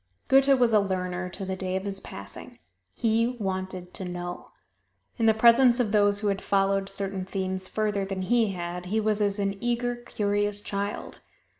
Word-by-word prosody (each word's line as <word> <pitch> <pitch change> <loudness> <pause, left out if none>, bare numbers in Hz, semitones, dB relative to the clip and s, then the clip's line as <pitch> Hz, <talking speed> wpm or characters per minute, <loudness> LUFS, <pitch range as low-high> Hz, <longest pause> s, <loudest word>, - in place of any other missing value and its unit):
Goethe 270 0 +6
was 240 -2 +3
a 215 - +7
learner 185 -2 -2
to 195 +2 -6
the 190 0 -3
day 185 0 -3
of 190 - -2
his 195 -1 -3
passing: 100 - -9 0.4
he 230 0 +2
wanted 185 -2 -4
to - - -4
know. 175 0 -6 0.7
In 225 - +3
the 220 - +6
presence 235 +2 +6
of 225 -4 +1
those 205 -1 +3
who 210 - +1
had 195 -1 -1
followed 195 0 +1
certain 195 -1 -3
themes 190 0 -2
further 210 -1 -1
than 195 -1 -3
he 225 0 +2
had, 175 0 -5
he 215 +4 0
was 215 -1 0
as 200 0 +1
an 200 0 -2
eager, 240 0 0
curious 205 -3 -1
child. 200 0 -4
200 Hz, 180 wpm, -27 LUFS, 190-220 Hz, 0.7 s, a